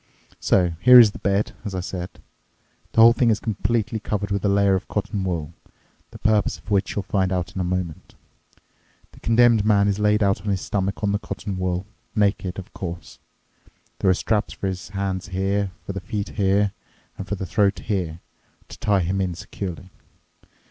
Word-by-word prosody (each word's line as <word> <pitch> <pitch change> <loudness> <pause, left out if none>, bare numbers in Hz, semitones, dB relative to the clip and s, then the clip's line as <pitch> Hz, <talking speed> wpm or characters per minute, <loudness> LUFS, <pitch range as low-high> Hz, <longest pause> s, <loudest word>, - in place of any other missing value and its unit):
So, 90 -3 +2
here 125 +4 +9
is 110 -4 +7
the - - -10
bed, 100 +1 0
as 100 -3 -5
I - - -1
said. 90 0 -5 0.8
The 115 - +5
whole 115 +1 +9
thing 120 0 +2
is 110 - +2
completely 110 0 -1
covered 105 -1 -3
with 100 -1 -1
a 100 - +2
layer 100 0 +3
of 95 0 -1
cotton 105 -1 -2
wool, 85 -4 -3 0.6
the - - -11
purpose 105 -2 +1
of - - -13
which 100 -2 +1
you'll 105 - -1
find 95 -2 0
out 90 -2 -2
in 95 - -2
a - - 0
moment. 90 -3 -4 1.0
The - - -17
condemned 115 -1 +4
man 100 -1 +4
is 100 0 0
laid 105 +1 +3
out 100 +1 +1
on 105 - -9
his 95 -3 0
stomach 100 +1 -2
on 100 - +2
the 100 - 0
cotton 105 -1 -5
wool—naked, 95 +1 -2
of 95 - -9
course. 85 -3 -7 0.8
There 95 - +2
are 95 - +5
straps 105 +2 -1
for 95 -1 -2
the 95 - -9
hands 95 -1 -2
here, 100 +1 -1 0.2
for 100 - -4
the 100 - -5
feet 100 +1 -4
here, 100 0 +1 0.4
and 95 - -7
for 105 - -2
the 95 - -5
throat 100 +2 +2
here, 90 -6 -3 0.5
to - - -11
tie 100 -2 +2
him 95 +3 -1
in 90 -2 -2
securely. 90 0 -7
100 Hz, 190 wpm, -23 LUFS, 95-105 Hz, 1.0 s, here